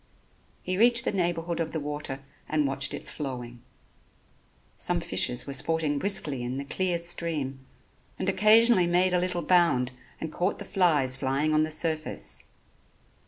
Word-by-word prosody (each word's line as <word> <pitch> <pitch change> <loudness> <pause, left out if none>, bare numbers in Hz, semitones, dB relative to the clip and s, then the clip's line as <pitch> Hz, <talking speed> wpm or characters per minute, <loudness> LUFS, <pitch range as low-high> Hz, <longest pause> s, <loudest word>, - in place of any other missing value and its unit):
He 185 +1 -2
reached 235 +1 +5
the - - +1
neighborhood 170 -3 -2
of 160 -1 -3
the 160 - -2
water 145 -2 -5 0.3
and 155 -1 +1
watched 135 0 -1
it - - -10
flowing. 125 -4 -7 1.1
Some 175 -1 +1
fishes 125 -7 +2
were 140 - -6
sporting 150 +1 0
briskly 170 -9 +1
in 125 +2 -4
the 140 - -5
clear 180 +4 -1
stream 165 -5 -2 0.6
and 190 - -3
occasionally 215 0 +5
made 180 +1 +2
a 180 - +3
little 180 -1 -2
bound 165 -9 +3 0.3
and 160 -1 -6
caught 180 +3 -1
the - - -8
flies 150 -9 +2
flying 140 +3 0
on 155 - +3
the 155 - 0
surface. 155 0 -2
160 Hz, 155 wpm, -27 LUFS, 140-180 Hz, 1.1 s, reached